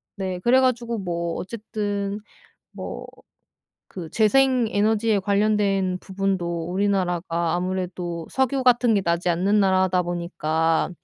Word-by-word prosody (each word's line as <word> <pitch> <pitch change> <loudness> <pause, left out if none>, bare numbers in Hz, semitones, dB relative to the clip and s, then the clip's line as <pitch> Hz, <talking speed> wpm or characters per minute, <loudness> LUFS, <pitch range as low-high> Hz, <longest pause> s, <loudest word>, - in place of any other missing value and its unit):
네. 190 -3 -4
그래 245 +7 +4
가지고 235 -2 0
뭐 170 -2 -3
어쨌든 205 -1 -4 0.5
뭐 - - -7 0.8
그 170 -4 -8
재생 255 +2 +3
에너지에 215 0 +1
관련된 200 -2 +1
부분도 185 -4 -2
우리나라가 175 -4 0
아무래도 180 -2 -3
석유 265 0 0
같은 245 -1 +4
게 200 - +3
나지 170 -1 -1
않는 195 +5 +2
나라다 185 -1 +2
보니까 165 -2 -1
195 Hz, 260 characters per minute, -23 LUFS, 175-215 Hz, 0.8 s, 그래